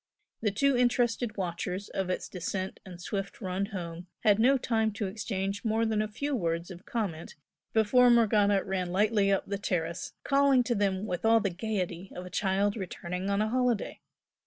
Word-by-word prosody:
The 215 - +2
two 275 +7 +2
interested 245 -2 +1
watchers 180 +1 -3
of 190 -1 -2
its 185 - -2
descent 185 +1 -4
and 180 -2 -10
swift 195 +2 -4
"run 190 0 -2
home" 175 -3 -6
had 210 -2 +4
no 265 +4 +5
time 225 -3 +1
to 205 0 -3
exchange 195 -1 -3
more 225 0 +1
than 220 -1 +1
a 215 - -1
few 280 +7 -2
words 170 -3 -2
of 180 +1 -11
comment 190 -9 -3 0.4
before 245 +3 +5
Morgana 210 -4 +4
ran 185 -2 -2
lightly 205 +1 +3
up 195 - +1
the 200 0 -3
terrace, 170 -3 -2
calling 275 -2 +4
to 240 - 0
them 200 -2 0
with 180 -4 -3
all 225 0 +5
the 200 -3 -1
gaiety 185 -2 -3
of 180 - -6
a 180 - -10
child 200 +1 +1
returning 180 -1 -4
on 200 +1 +2
a 215 - -1
holiday. 245 -3 0
200 Hz, 185 wpm, -29 LUFS, 185-225 Hz, 0.4 s, no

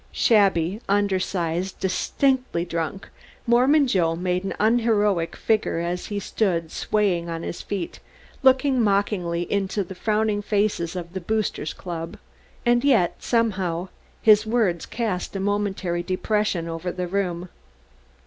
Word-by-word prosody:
Shabby, 195 -3 +3
undersized, 190 -3 0
distinctly 255 +1 0
drunk, 165 +2 -4 0.4
Mormon 260 +5 +4
Joe 175 -9 +1
made 180 +1 -1
an 195 - -3
unheroic 210 -6 +2
figure 220 -6 0
as 175 +1 -3
he 205 -1 -3
stood 175 -6 -1
swaying 185 -5 0
on 165 0 -4
his - - -5
feet 195 -4 -5 0.4
looking 265 -1 +4
mockingly 195 -5 +1
into 200 +2 -1
the 190 - -9
frowning 215 +1 0
faces 200 -5 0
of 175 -1 -6
the 190 - -4
Boosters 215 -5 -2
Club, 165 -2 -6 0.5
and 240 0 +3
yet, 230 -12 +3
somehow, 190 -7 0 0.3
his 215 -1 +7
words 220 -7 0
cast 210 -6 -3
a - - -1
momentary 195 -3 -1
depression 185 -1 -1
over 165 +2 -4
the 180 0 -3
room. 180 -2 -2
195 Hz, 130 wpm, -24 LUFS, 175-215 Hz, 0.5 s, his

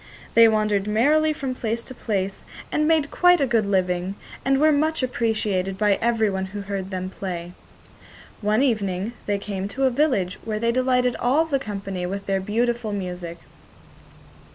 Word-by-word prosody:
They 230 0 +8
wandered 210 -2 +1
merrily 295 +9 +3
from 275 -4 -3
place 230 -1 -3
to 260 - -9
place 200 -5 -3 0.3
and 305 0 +1
made 315 -3 +2
quite 355 -1 +5
a 280 - +3
good 230 -5 +1
living, 185 -1 0 0.3
and 270 0 +2
were 310 +1 +5
much 305 0 +1
appreciated 210 -6 -1
by 205 -1 +2
everyone 220 -5 +1
who 200 +2 -6
heard 195 -1 -4
them 185 -1 -4
play. 175 -3 -5 0.9
One 215 +4 +2
evening 205 -4 0
they 205 -1 +1
came 200 -1 -4
to 255 +7 -3
a 260 - +4
village 245 - +1
where 215 -1 -3
they 230 +2 +1
delighted 250 0 +2
all 280 +7 +3
the 280 -4 0
company 195 -6 -4
with 195 +2 -5
their 195 -1 0
beautiful 230 +2 -1
music. 180 -3 -5
215 Hz, 165 wpm, -23 LUFS, 195-255 Hz, 0.9 s, They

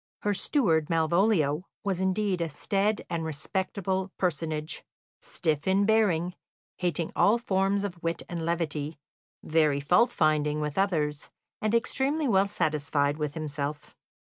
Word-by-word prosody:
Her 205 - +2
steward, 175 - +1
Malvolio, 165 -1 +2 0.2
was 190 -3 -1
indeed 190 -1 0
a 165 - -1
staid 200 +8 0
and 165 -1 -2
respectable 190 +5 -2
personage, 155 -2 -2 0.4
stiff 155 -2 -2
in 195 +2 +3
bearing, 190 -6 +2 0.4
hating 175 -2 0
all 215 +4 +4
forms 195 -3 +1
of 180 -4 -5
wit 165 0 -2
and 170 -2 -4
levity, 160 -2 -2 0.5
very 155 -3 +2
fault 180 - +3
finding 150 -6 +1
with 150 -1 -3
others, 155 -7 0 0.3
and 215 +1 +1
extremely 275 +6 +1
well 195 -3 +3
satisfied 150 -5 0
with 150 -1 -3
himself. 145 -2 -4
170 Hz, 130 wpm, -28 LUFS, 150-195 Hz, 0.5 s, all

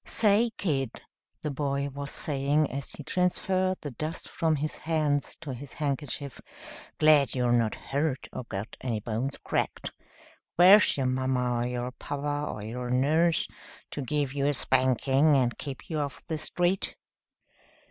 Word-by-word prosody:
"Say, 220 +2 +4
kid," 135 - -2 0.4
the 150 - -1
boy 140 0 -1
was 140 +1 -5
saying, 145 +1 +1
as 140 +1 -4
he 150 - -8
transferred 185 +2 0
the 145 - -5
dust 155 +6 -5
from 160 -1 0
his 150 +1 -3
hands 155 -3 0
to 145 -5 -5
his 130 +1 -8
handkerchief, 140 -1 -3 0.6
"glad 150 -5 +5
you're 125 -1 +1
not 115 -2 +2
hurt 140 -1 -2
or 125 - -5
got 105 0 -6
any 120 -4 -1
bones 115 +6 -3
cracked. - - -2 0.6
Where's 185 +2 +7
your 135 - 0
mama, 130 -1 0
or 120 - 0
your 125 0 -3
papa, 145 +2 -3
or 105 - -7
your 125 +2 -4
nurse, 155 +6 +2 0.4
to - - -4
give 140 0 -1
you 140 0 0
a 145 - +2
spanking 130 +3 +3
and 125 -2 +1
keep 135 -5 -7
you 155 -2 -2
off 140 -2 -4
the 160 -3 -3
street?" 175 +4 0
140 Hz, 155 wpm, -28 LUFS, 130-155 Hz, 0.6 s, Where's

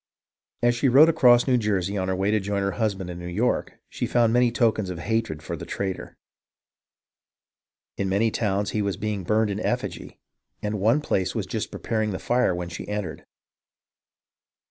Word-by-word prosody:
As 120 0 +4
she 125 +3 +1
rode 145 +6 +7
across 120 -6 +5
New 125 -2 +3
Jersey 100 -3 -1
on 95 -2 -1
her 95 - 0
way 95 +2 0
to 110 - +2
join 100 0 -2
her 100 - 0
husband 100 -6 -2
in 85 - -7
New 85 - -7
York, 105 +8 0
she - - -3
found 115 -2 +3
many 125 -1 +4
tokens 110 -5 +1
of 90 - -5
hatred 105 -5 -2
for - - -4
the - - -8
traitor. 95 -2 -5 1.8
In 100 -1 -1
many 105 +4 +2
towns 100 -2 -1
he 105 - -1
was 100 -2 -1
being 105 -2 -3
burned 105 +3 +1
in 100 - -3
effigy, - - -3 0.4
and 105 -1 -3
one 115 +9 +3
place 95 -9 -1
was - - -1
just - - -3
preparing 110 -1 -2
the 95 - -3
fire 120 -5 +1
when 90 0 -4
she 90 - -7
entered. 100 -7 -5
105 Hz, 185 wpm, -25 LUFS, 95-115 Hz, 1.8 s, rode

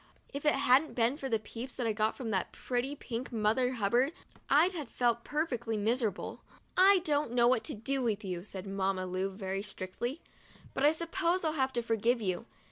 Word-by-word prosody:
If 280 +2 -2
it 295 - +5
hadn't 275 +2 +3
been 235 +2 +2
for 270 -3 -4
the 225 - +2
peeps 230 +4 -8
that 250 - -2
I 225 - +1
got 215 +3 0
at 235 -4 -3
that 190 -3 0
pretty 255 +3 -2
pink 250 -2 -5
Mother 230 +3 +2
Hubbard, 240 +6 +2 0.4
I'd 310 +6 +5
have 305 -9 -6
felt 235 -1 +1
perfectly 245 -8 -1
miserable. 220 -1 -1 0.2
" - - -37
I 380 0 +6
don't 290 -5 +1
know 240 -1 +5
what 245 -3 +3
to - - -1
do 265 +5 -1
with 220 -3 -1
you," 180 -2 -4
said 190 -2 -7
Mamma 195 -1 -1
Lu, 185 +1 -1
very 195 0 -4
strictly; 210 - -5 0.5
"but - - -2
I 295 - +7
suppose 340 +2 0
I'll 315 -1 +1
have 265 -3 +1
to 240 - -1
forgive 230 +2 +2
you. 200 +2 -2
240 Hz, 205 wpm, -31 LUFS, 210-275 Hz, 0.5 s, I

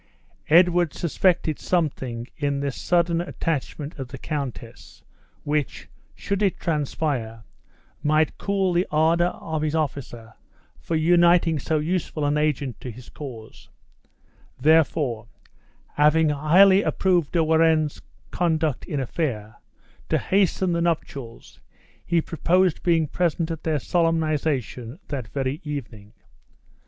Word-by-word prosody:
Edward 175 -1 +4
suspected 170 -2 +1
something 135 -9 -1
in 140 -1 -1
this 140 -1 -3
sudden 170 -1 +1
attachment 155 -3 -4
of 135 - -5
the 135 - -9
countess, 130 -5 -6 0.4
which, 145 -2 -2 0.3
should 200 0 -3
it 195 -3 +1
transpire, 140 -7 -2 0.6
might 155 +1 +1
cool 195 -2 0
the 175 +2 +1
ardor 165 +3 +3
of 160 -3 -4
his 155 0 -1
officer 125 -7 -4 0.5
for 165 - -3
uniting 170 0 +4
so 155 +3 -1
useful 155 -1 -2
an 145 +1 +1
agent 145 -4 -1
to 125 - -6
his 120 +2 -11
cause; 120 -7 -10 0.9
therefore, 145 -5 +2 0.7
having 150 +2 +4
highly 180 +7 +5
approved 180 -7 +1
De 170 -2 +3
Warenne's 160 -1 +2 0.3
conduct 160 -5 0
in 145 - -3
affair, 120 -6 -3 0.5
to - - +2
hasten 190 -1 +1
the 170 0 0
nuptials, 140 -8 -4 0.4
he 170 -1 +1
proposed 175 +2 +1
being 165 -3 +2
present 170 0 -1
at 160 -1 -5
their 160 -2 0
solemnization 155 -6 -1
that 130 -6 -4
very 135 +4 -3
evening. 115 -8 -7
155 Hz, 120 wpm, -24 LUFS, 140-170 Hz, 0.9 s, highly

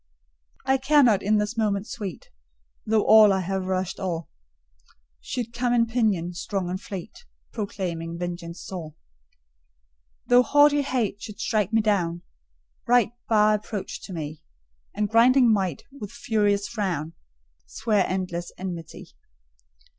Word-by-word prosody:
I 265 0 +3
care 285 +2 +4
not 215 -6 +4
in 210 +2 +2
this 210 +3 -1
moment 210 -3 0
sweet, 200 -7 -7 0.6
Though 215 -1 +3
all 215 -1 +8
I 190 -1 +1
have 190 +1 -3
rushed 185 0 -2
o'er 170 -3 -2 1.0
Should 235 - -5
come 245 0 0
on 235 -1 +4
pinion, 215 -7 0
strong 180 0 -3
and 185 +2 -4
fleet, 195 - -8 0.3
Proclaiming 175 -6 -4
vengeance 175 -1 -6
sore: 160 -5 -7 1.3
Though 245 0 +6
haughty 290 +3 +4
Hate 235 -7 -2
should 210 -1 -9
strike 215 -4 0
me 225 0 +3
down, 175 -5 0 0.6
Right, 240 -3 +4 0.2
bar 215 -1 +4
approach 210 -1 -4
to - - -10
me, 155 -2 -6 0.5
And 210 +1 0
grinding 235 +2 +5
Might, 190 -7 -1
with 260 -8 -8
furious 210 -7 0
frown, 180 -9 -3 0.5
Swear 210 -4 +1
endless 180 -2 -3
enmity. 175 -4 -7
205 Hz, 130 wpm, -25 LUFS, 180-230 Hz, 1.3 s, all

